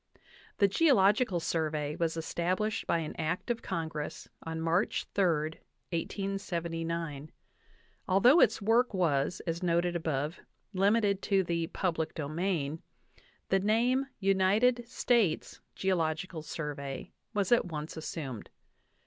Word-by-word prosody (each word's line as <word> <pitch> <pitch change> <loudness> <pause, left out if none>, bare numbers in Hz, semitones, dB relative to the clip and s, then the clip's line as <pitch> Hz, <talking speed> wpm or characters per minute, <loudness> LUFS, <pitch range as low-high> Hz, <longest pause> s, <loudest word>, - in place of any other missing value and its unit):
The 200 - +5
"Geological 205 - +4
Survey" 155 -3 -1
was 165 -1 -1
established 185 +7 -1
by - - +2
an 160 -2 -4
act 170 +9 -1
of 230 - -2
Con 165 -1 -2
gress 150 -1 -6
on 160 0 -5
March 165 +5 +1
3, 200 - +2 0.7
1879. 170 -5 -3 0.8
Although 240 - +6
its 215 - +4
work 230 +1 +3
was, 160 -2 +1
as 165 -1 -2
noted 175 0 +1
above, 160 -1 -2 0.3
limited 200 +1 +2
to 195 -2 +2
the 170 -1 -1
"public 165 -3 -2
domain," 160 0 -2 0.7
the 195 - +3
name 240 +7 +2
"United 205 +6 +3
States 230 -9 +1
Geological 170 -2 -1
Survey" 150 0 -5 0.2
was 200 0 0
at 240 - +5
once 155 -3 -5
assumed. 150 -7 -6
175 Hz, 115 wpm, -31 LUFS, 160-200 Hz, 0.8 s, Although